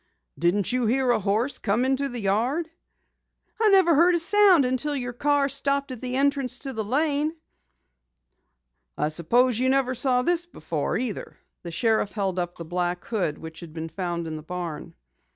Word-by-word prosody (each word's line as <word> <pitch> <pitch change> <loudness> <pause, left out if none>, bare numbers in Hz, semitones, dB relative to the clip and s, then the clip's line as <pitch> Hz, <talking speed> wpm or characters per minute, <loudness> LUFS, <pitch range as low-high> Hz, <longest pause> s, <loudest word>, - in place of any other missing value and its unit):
"Didn't 180 +5 +1
you 250 -2 +1
hear 255 +2 +2
a 240 - +2
horse 215 +7 0
come 225 +4 +1
into 270 +1 0
the 245 -2 -5
yard?" 240 - 0 0.9
"I 440 - +5
never 380 -4 +5
heard 345 +4 +5
a - - +1
sound 370 -3 +5
until 260 +4 -1
your 245 -2 -4
car 285 +2 +2
stopped 280 0 0
at 250 - -7
the 250 0 -3
entrance 275 -2 +1
to 270 +1 -5
the 220 -2 -3
lane." 295 +6 0 1.6
"I 150 - 0
suppose 230 +10 +2
you 260 +1 +2
never 265 -1 +2
saw 250 0 +1
this 345 +3 +1
before - - -3
either." 245 -5 -5 0.2
The 175 - -7
sheriff 215 +4 0
held 195 -3 -1
up 175 0 -4
the 170 - -7
black 175 +1 -2
hood 185 -10 -2
which 160 0 -10
had 170 -3 -10
been 165 0 -5
found 175 -2 -3
in 160 -1 -5
the - - -8
barn. 170 -1 -5
Mrs. - - -18
250 Hz, 185 wpm, -25 LUFS, 180-280 Hz, 1.6 s, I